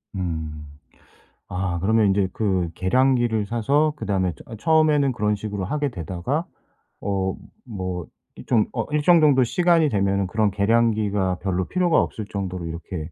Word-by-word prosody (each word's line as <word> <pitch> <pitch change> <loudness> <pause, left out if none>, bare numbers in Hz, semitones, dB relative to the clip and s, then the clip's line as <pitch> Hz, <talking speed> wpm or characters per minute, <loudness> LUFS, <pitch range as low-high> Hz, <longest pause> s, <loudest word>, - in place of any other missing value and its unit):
음. 80 -4 -4 0.8
아 90 -1 -2
그러면 110 +3 +3
인제 95 -1 +2
그 95 -5 0
계량기를 120 +1 +2
사서 140 +8 +1
그다음에 95 - -1
저 110 - -11
처음에는 155 -1 +3
그런 105 -2 0
식으로 100 -2 -4
하게 145 +6 -1
되다가 95 - -3 0.6
어 95 -2 -1 0.3
뭐 95 -6 -5 0.3
이 - - -11
좀 115 -4 +3
어 115 -3 -2
일정 155 +3 +4
정도 140 -4 +5
시간이 170 +4 +3
되면은 100 -3 +1
그런 105 +3 +1
계량기가 105 -2 +1
별로 95 -2 -1
필요가 180 -3 +2
없을 110 - -4
정도로 95 -4 -5
이렇게 85 0 -6
105 Hz, 305 characters per minute, -23 LUFS, 95-130 Hz, 0.8 s, 정도